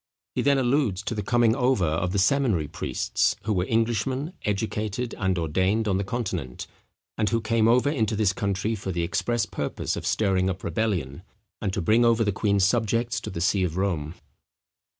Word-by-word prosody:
He - - 0
then 140 0 +3
alludes 125 -7 +1
to 115 - -3
the 105 - -2
coming 120 +1 +3
over 125 -7 +2
of 80 +3 0
the 100 - -1
seminary 100 - +2
priests, - - -1
who 110 +1 0
were 90 -1 0
Englishmen, 120 - 0
educated 105 +3 -2
and 95 -3 +1
ordained 95 +7 +1
on 95 -2 +1
the - - -1
Continent, 95 - -4 0.5
and 105 -2 +2
who 115 - +1
came 115 0 +2
over 125 +4 +4
into 110 -7 0
this 100 -2 +2
country 100 +2 -1
for 95 -3 -4
the 85 -1 -1
express 115 +6 0
purpose - - -3
of - - -4
stirring 95 -3 +1
up 95 0 -4
rebellion, 85 -6 -2 0.4
and 100 - -1
to - - -2
bring 110 +7 +4
over 115 -1 +4
the 105 - +1
queen's 100 -1 +2
subjects 115 +2 0
to - - -6
the 85 - -5
see 95 +2 +2
of 85 -1 -2
Rome. 85 -5 -1
105 Hz, 190 wpm, -25 LUFS, 95-115 Hz, 0.5 s, over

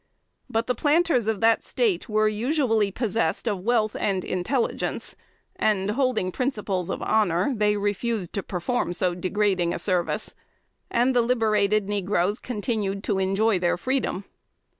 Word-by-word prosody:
But 225 +1 0
the 250 - 0
planters 295 -2 +2
of 220 -2 -1
that 225 0 +4
State 405 - 0
were 215 0 +3
usually 225 -1 +1
possessed 225 +2 -1
of 205 -4 0
wealth 215 +1 +1
and 195 -3 -1
intelligence, 185 +8 -2 0.4
and, 205 -2 +1
holding 245 -6 0
principles 205 -7 -2
of - - -3
honor, 200 +2 +2
they 210 -1 +2
refused 205 -1 -2
to 200 - -1
perform 185 +3 -2
so 180 0 0
degrading 185 -1 0
a - - -2
service; 180 -3 -1 0.6
and 250 +2 +2
the 245 - +5
liberated 215 -4 +2
negroes 205 0 0
continued 210 -4 -3
to 200 -2 0
enjoy 195 +2 +2
their 175 0 +1
freedom. 255 -4 -1
210 Hz, 140 wpm, -25 LUFS, 195-235 Hz, 0.6 s, the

